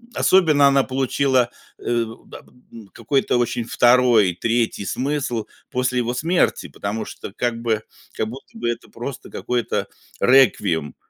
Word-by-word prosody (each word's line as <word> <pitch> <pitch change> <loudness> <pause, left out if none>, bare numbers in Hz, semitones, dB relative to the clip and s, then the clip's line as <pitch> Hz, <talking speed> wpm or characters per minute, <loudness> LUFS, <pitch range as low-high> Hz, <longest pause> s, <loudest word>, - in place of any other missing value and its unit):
особенно 155 -7 +4
она 140 0 +4
получила, 130 -1 +1 0.3
э, 120 -1 0 0.2
да - - -11
п - - -24 0.2
м, 115 -3 -12
какой-то 125 +2 0
очень 120 -1 -1
2, 120 -6 +4
3 115 +2 -1
смысл 130 -4 -2 0.2
после 125 0 0
его 120 0 -1
смерти, 165 +7 +1
потому 105 +2 -4
что - - -9
как 120 0 -2
бы 110 -2 0 0.3
как 110 - -2
будто 135 - -11
бы 120 - -2
это 120 0 -5
просто 125 +3 -7
какой-то 125 -1 -2 0.3
реквием. 105 - +3
120 Hz, 140 wpm, -21 LUFS, 115-135 Hz, 0.3 s, особенно